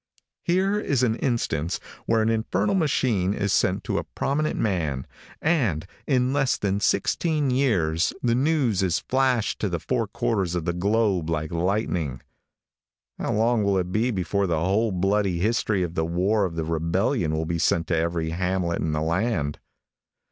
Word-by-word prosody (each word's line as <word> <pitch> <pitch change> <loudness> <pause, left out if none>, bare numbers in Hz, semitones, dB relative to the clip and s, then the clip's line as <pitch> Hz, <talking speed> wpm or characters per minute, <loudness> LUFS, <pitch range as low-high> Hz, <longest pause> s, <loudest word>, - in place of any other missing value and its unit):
Here 190 +4 +1
is 140 - 0
an 115 -3 +3
instance 115 - -1 0.3
where 115 -1 +3
an 110 - +1
infernal 115 - 0
machine 120 - +1
is 100 -1 0
sent - - +1
to - - -1
a - - -4
prominent 155 +3 -2
man, 80 -11 -1 0.4
and 120 - +1 0.2
in 130 -2 +2
less 135 -2 +2
than 100 -1 -1
sixteen 150 +5 +1
years 90 - +1
the 120 -1 +2
news 130 - +2
is 90 -3 +1
flashed 130 -4 0
to 105 - -1
the 85 - -1
four 115 +4 -1
quarters 95 -3 -1
of 85 -2 -2
the 85 - 0
globe 100 -2 +1
like 80 -1 -2
lightning. 85 - -1 1.0
How - - -1
long 115 0 +2
will 100 -1 +2
it 90 -1 -1
be 110 +5 +1
before 100 -1 0
the 85 -3 0
whole 100 +6 +1
bloody 95 0 +1
history 105 0 +1
of 85 -2 -4
the 80 - 0
war 95 +5 +1
of 85 -3 -4
the 80 -1 -2
rebellion 85 - 0
will 80 +1 -1
be 85 +1 -2
sent 80 +1 +2
to 85 - +2
every 80 0 -1
hamlet 90 0 -1
in 80 -1 -1
the 75 - -1
land? 85 -3 -1
100 Hz, 170 wpm, -25 LUFS, 85-120 Hz, 1.0 s, an